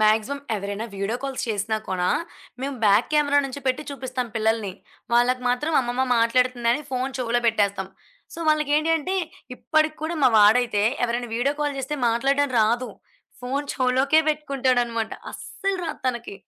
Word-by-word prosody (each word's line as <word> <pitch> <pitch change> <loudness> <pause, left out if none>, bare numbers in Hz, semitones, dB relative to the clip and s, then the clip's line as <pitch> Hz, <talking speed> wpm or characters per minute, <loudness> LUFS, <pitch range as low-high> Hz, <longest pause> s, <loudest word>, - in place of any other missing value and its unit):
Maximum 220 +6 +2 0.2
ఎవరైనా 200 +2 -4
video 200 +4 -2
calls 270 -1 -3
చేసినా 215 +1 -1
కూడా, 180 -1 0 0.5
మేము 275 +1 -3
బాక్ 205 +3 +4
కెమెరా 285 -1 +3
నుంచి 275 +2 -7
పెట్టి 260 +4 +1
చూపిస్తాం 255 -2 -4
పిల్లలిని. 220 -3 0 0.4
వాళ్ళకి 250 +1 +3
మాత్రం 295 +6 0
అమ్మమ్మ 245 +1 -1 0.2
మాట్లాడతందని 245 +2 +2
ఫోను 260 +1 -1
చెవులో 240 -1 0
బెట్టేస్తాం. 200 -3 +1 0.5
సో, - - -9
వాళ్ళకి 305 -1 +2
ఏంటి 310 +2 +1
అంటే 370 +5 -2 0.4
ఇప్పటికి 310 0 +1
కూడా 320 +2 -2
మా - - +7
వాడైతే 210 0 +4 0.2
ఎవరైనా 240 0 -2
వీడియో 275 +4 +1
కాల్ 290 -1 -1
జేస్తే 270 +3 -3
మాట్లాడ్డం 275 +4 +1
రాదు. 235 +4 +1 0.5
ఫోను 270 +4 -2
చెవులోకే 260 +5 +3
బెట్టుకుంటాడనమాట. 255 -6 0 0.2
అస్సలు 390 0 -3
రాదు - - -5
తనకి. 240 -4 -3
250 Hz, 145 wpm, -24 LUFS, 225-280 Hz, 0.5 s, మా